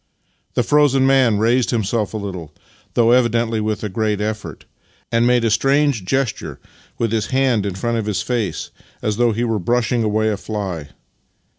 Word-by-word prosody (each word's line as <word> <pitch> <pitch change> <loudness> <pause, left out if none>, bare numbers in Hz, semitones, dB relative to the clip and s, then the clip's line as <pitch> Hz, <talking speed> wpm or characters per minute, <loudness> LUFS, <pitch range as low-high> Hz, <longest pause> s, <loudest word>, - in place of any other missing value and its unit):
The - - +2
frozen 145 -3 +3
man 130 -5 +4
raised 115 +2 +2
himself 110 -1 -1
a - - -1
little 90 -7 -6 0.2
— - - -33
though 115 -1 +4
evidently 115 -2 +2
with 110 0 -2
a - - -1
great 105 +1 -1
effort 105 0 -4 0.2
— - - -36
and 115 0 +3
made 125 -1 +3
a 115 - +2
strange 135 -3 +2
gesture 135 +3 -2 0.4
with 115 -2 -1
his 110 -2 0
hand 130 -6 +1
in 95 - -4
front 115 +4 -1
of 110 - -4
his 105 -3 -1
face, 120 -5 -2 0.3
as 105 -1 -1
though 120 -1 +3
he 115 +2 -1
were 115 -3 0
brushing 120 +4 0
away 110 0 +1
a 105 - -1
fly. 95 -8 -5
115 Hz, 185 wpm, -19 LUFS, 105-120 Hz, 0.4 s, man